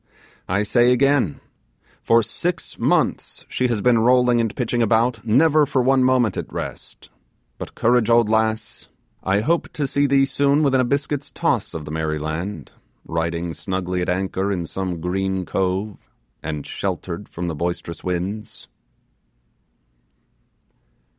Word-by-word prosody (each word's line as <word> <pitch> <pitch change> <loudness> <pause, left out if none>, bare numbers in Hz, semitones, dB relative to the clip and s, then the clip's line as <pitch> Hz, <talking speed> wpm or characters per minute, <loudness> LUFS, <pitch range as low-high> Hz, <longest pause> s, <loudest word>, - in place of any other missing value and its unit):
I 100 +3 +1
say 120 +4 +3
again: 130 - +2 0.6
for 115 0 +4
six 170 - -3
months - - 0
she 125 - 0
has 115 -4 -1
been 120 0 +4
rolling 125 0 +4
and 115 -2 -2
pitching 120 -1 -1
about, 115 0 +2
never 145 +6 +4
for 130 -2 +1
one 130 0 +3
moment 125 -6 +3
at - - -5
rest. - - -7 0.5
But - - -8
courage, 120 -1 +2
old 115 -1 +5
lass, 110 0 -1 0.3
I 100 +2 +1
hope 165 +9 0
to 145 - -1
see 140 +1 +1
thee 135 0 +4
soon 140 +2 +2
within 135 -2 +3
a - - +1
biscuit's 140 +2 -1
toss - - -1
of 80 -2 -5
the 75 - -7
merry 80 -1 -1
land, 80 +7 -5 0.3
riding 85 +1 -2
snugly 90 -1 -3
at 90 - -2
anchor 95 +2 -1
in 90 -3 -2
some 90 -1 -4
green 95 +1 -1
cove, 95 +3 -1 0.4
and 75 -2 -5
sheltered - - -4
from 90 +1 -5
the 85 - -2
boisterous 85 +1 -4
winds. 95 +4 -4
110 Hz, 145 wpm, -22 LUFS, 90-125 Hz, 0.6 s, old